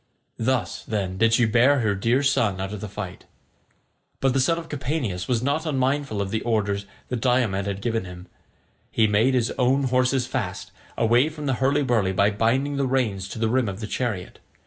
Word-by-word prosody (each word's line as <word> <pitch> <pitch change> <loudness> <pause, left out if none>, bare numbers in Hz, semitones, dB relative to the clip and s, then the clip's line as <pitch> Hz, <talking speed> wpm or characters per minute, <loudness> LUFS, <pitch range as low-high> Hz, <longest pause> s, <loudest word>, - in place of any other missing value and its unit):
Thus, 130 +2 -1
then, 95 -4 -3
did 115 0 +4
she 120 - +4
bear 125 +5 +4
her 105 -3 +1
dear 115 +7 +1
son 110 -8 +1
out 95 +2 -4
of 105 - -6
the 105 - -4
fight. 95 -2 -7 0.9
But 135 -1 +2
the 135 - +2
son 165 +6 +2
of 165 -1 -6
Capaneus 130 - -3
was 120 -2 0
not 150 +4 0
unmindful 135 -6 0
of 95 - -6
the 110 - -1
orders 100 -3 -1 0.2
that 125 -2 -3
Diomed 110 -6 +1
had 100 0 -4
given 115 -4 -1
him. 90 0 -10 0.6
He 110 - +2
made 110 +5 +3
his 120 -1 +1
own 130 +2 +3
horses 130 0 +2
fast, 115 -8 -4 0.3
away 120 +6 +3
from 155 -1 -8
the 135 - +1
hurly 140 +2 +2
burly, 110 -7 +1
by 100 +3 +3
binding 130 +7 0
the 140 -1 +1
reins 110 -8 0
to - - -7
the 115 0 +1
rim 120 -1 +1
of 95 0 -6
the 110 - -4
chariot. 105 -4 -3
120 Hz, 200 wpm, -24 LUFS, 100-130 Hz, 0.9 s, did